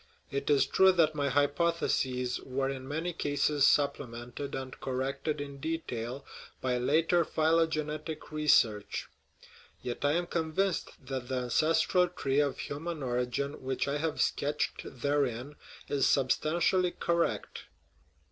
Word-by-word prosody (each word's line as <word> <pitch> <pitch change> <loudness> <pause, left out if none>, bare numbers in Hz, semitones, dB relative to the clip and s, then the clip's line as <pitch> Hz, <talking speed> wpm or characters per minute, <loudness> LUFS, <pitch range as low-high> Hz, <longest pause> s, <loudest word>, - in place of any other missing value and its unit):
It 140 +1 -2
is 140 -2 +5
true 190 +7 +5
that 160 -3 +3
my 145 -2 0
hypotheses 145 -3 +1
were 135 +1 -2
in 130 -1 -7
many 160 +5 -2
cases 145 -1 +2
supplemented 135 -2 -1
and 130 -1 -6
corrected 135 +3 -2
in 140 -1 -6
de 160 +3 -1
tail 125 -2 -6 0.3
by 125 -1 0
later 165 +6 +3
phylogenetic 155 -1 0
research; 115 -9 +2 0.7
yet 125 +1 -4
I 145 +1 +3
am 175 +2 +1
convinced 170 -1 -2
that 130 -1 -4
the 130 - -2
ancestral 160 +8 +2
tree 140 -6 -1
of 145 -2 +1
human 155 +1 -5
origin 125 +3 -2
which 130 +1 -2
I 140 +1 0
have 155 0 -2
sketched 145 +1 0
therein 140 0 -1 0.3
is 140 -1 +2
substantially 170 +7 +2
correct. 170 0 -1
145 Hz, 130 wpm, -30 LUFS, 130-160 Hz, 0.7 s, is